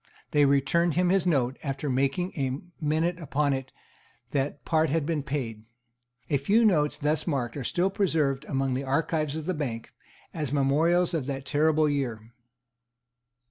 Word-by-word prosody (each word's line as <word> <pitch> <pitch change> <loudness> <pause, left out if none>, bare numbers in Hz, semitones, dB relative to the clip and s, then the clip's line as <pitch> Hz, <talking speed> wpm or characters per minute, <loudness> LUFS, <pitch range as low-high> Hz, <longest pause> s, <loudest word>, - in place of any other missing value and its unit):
They 145 -1 +4
returned 140 +4 +2
him 180 0 +2
his 190 -1 +2
note, 135 -5 +1
after 140 0 -3
making 140 +7 0
a 135 -2 -2 0.3
minute 160 +4 0
upon 145 -3 0
it 130 -1 -4 0.6
that 140 0 -2
part 160 -1 +2
had 155 0 0
been 160 -2 -1
paid. 125 -6 -4 0.6
A 145 - +2
few 205 - +3
notes 150 -8 +2
thus 150 +3 0
marked 130 -7 -1
are 140 - -4
still 180 +9 0
preserved 155 -8 +1
among 135 -2 -1
the 130 +2 -2
archives 155 +2 0
of 160 -1 -4
the 185 - 0
Bank, 125 -8 -4 0.4
as 150 -5 -3
memorials 160 +6 +2
of 150 -6 -1
that 135 -1 -4
terrible 155 +1 +2
year. 120 -6 -3
145 Hz, 160 wpm, -27 LUFS, 135-165 Hz, 0.6 s, They